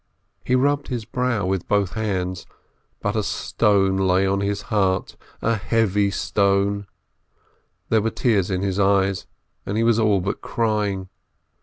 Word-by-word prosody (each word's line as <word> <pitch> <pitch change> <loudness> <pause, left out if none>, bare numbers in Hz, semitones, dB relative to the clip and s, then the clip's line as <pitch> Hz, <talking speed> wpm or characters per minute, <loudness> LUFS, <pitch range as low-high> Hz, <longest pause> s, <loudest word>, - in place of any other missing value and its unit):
He 125 - +1
rubbed 140 +2 +1
his 120 -4 -4
brow 120 -3 -1
with 95 -1 -2
both 100 -3 +1
hands, 95 -5 -3 0.5
but - - -1
a - - +2
stone 95 -2 +1
lay 95 0 +2
on 100 0 +1
his 100 0 -2
heart, 95 -3 +1 0.3
a 115 - +2
heavy 105 +1 +1
stone; 100 0 0 1.0
there 110 -1 +3
were 115 - 0
tears 105 -6 +1
in 95 0 -1
his 100 0 -1
eyes, 95 -1 +2 0.4
and 100 - -3
he 115 - +2
was 115 -1 +3
all 105 -3 +3
but 95 +2 -3
crying. 105 -4 -1
100 Hz, 150 wpm, -22 LUFS, 95-110 Hz, 1.0 s, there